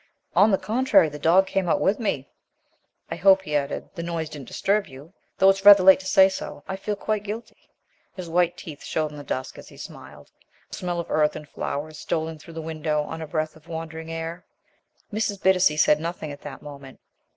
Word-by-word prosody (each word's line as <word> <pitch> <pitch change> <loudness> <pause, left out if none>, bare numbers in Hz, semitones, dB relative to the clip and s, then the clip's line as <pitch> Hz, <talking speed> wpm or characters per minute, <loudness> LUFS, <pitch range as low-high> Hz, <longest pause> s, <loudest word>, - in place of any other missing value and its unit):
"On 205 - +6
the 195 - +3
contrary. 220 -3 +3
The 150 0 -9
dog 175 +6 +4
came 190 -2 -1
out - - +2
with 200 +5 +1
me. 145 - -2 0.8
I - - -1
hope," 190 0 +5
he 150 -5 -3
added, 140 -1 -2
"the 175 - -6
noise 165 -2 -3
didn't 145 -4 -9
disturb 205 0 0
you, 140 +7 -13 0.2
though 190 0 +6
it's 195 0 -4
rather 200 -2 +9
late 190 0 +8
to 190 - -8
say 190 0 +6
so. 190 - -6
I 190 - -3
feel 205 +2 -3
quite 215 +1 -2
guilty." 215 +3 -8 0.5
His 185 -2 -7
white 175 +1 +1
teeth 150 -3 -10
showed 155 -1 -2
in 150 - -10
the - - -8
dusk 130 -1 -5
as - - -12
he - - -16
smiled. - - -11 0.4
A - - -12
smell 175 -1 -3
of 170 - -5
earth 150 -1 +2
and 150 -1 -8
flowers 150 +2 -5
stole 160 -1 -2
in 160 -1 -9
through 165 +2 -13
the 160 - -5
window 155 -1 -1
on 160 +2 -7
a 160 - -5
breath 155 0 -2
of 160 - -19
wandering 160 0 -6
air. 165 +2 -5 0.7
Mrs. 210 -2 -1
Bittacy 185 -5 +3
said 150 0 +4
nothing 165 -2 -5
at 145 - -10
the 140 -2 -8
moment. 140 -2 -11
165 Hz, 220 wpm, -24 LUFS, 150-190 Hz, 0.8 s, rather